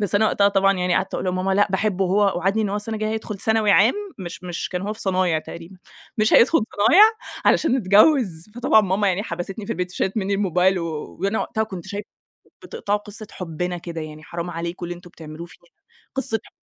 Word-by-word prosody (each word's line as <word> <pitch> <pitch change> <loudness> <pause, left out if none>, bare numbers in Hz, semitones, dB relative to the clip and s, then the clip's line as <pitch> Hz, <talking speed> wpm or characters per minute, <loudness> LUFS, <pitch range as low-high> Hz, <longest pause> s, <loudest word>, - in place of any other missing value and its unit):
بس 205 -2 -1
أنا 215 +2 +4
وقتها 200 -1 +3
طبعًا 195 0 +3
يعني 180 -1 0
قعدت 190 - -1
أقول - - -3
لماما: 185 +1 0
"لأ 205 - +4
باحبه 195 0 0
هو 200 +2 +2
وعدني 195 +5 +1
إن 205 - -1
هو 200 - -2
السنة 210 +2 -4
الجايّة 215 0 -2
هيدخل 215 -2 -5
ثانوي 220 0 +2
عام- 205 +4 +5 0.2
مش 175 -1 -7
مش 175 -1 -4
كان 180 -1 -4
هو 210 +2 -3
في 220 - -7
صنايع 185 -4 +1
تقريبًا- 170 +4 -10 0.4
مش 215 +1 +2
هيدخل 270 +8 +6 0.3
صنايع 385 - +7 0.4
علشان 265 -5 +3
نتجوز." 210 - +3
فطبعًا 240 -3 +4
ماما 200 +1 +1
يعني 190 +2 0
حبستني 195 +2 -6
في - - -2
البيت 180 +1 -4
وشالت 190 +3 -2
مِنّي 200 -1 0
الموبايل 190 -1 +2
و 170 - -3 0.3
وأنا 200 +3 0
وقتها 220 - -1
كنت 190 -5 -8
شايفة: 200 +1 -6 0.6
"بتقطعوا 205 +1 -2
قصّة 210 +1 -10
حبنا 180 0 -4
كده، 165 -1 -6
يعني 155 0 -9
حرام 170 +2 -5
عليكم 170 +1 -5
اللي 175 - -5
أنتم 175 0 -14
بتعملوه 160 0 -10
فينا، 175 - -16 0.5
قصة 225 -4 -1
حب" - - -17
195 Hz, 210 wpm, -22 LUFS, 175-210 Hz, 0.6 s, صنايع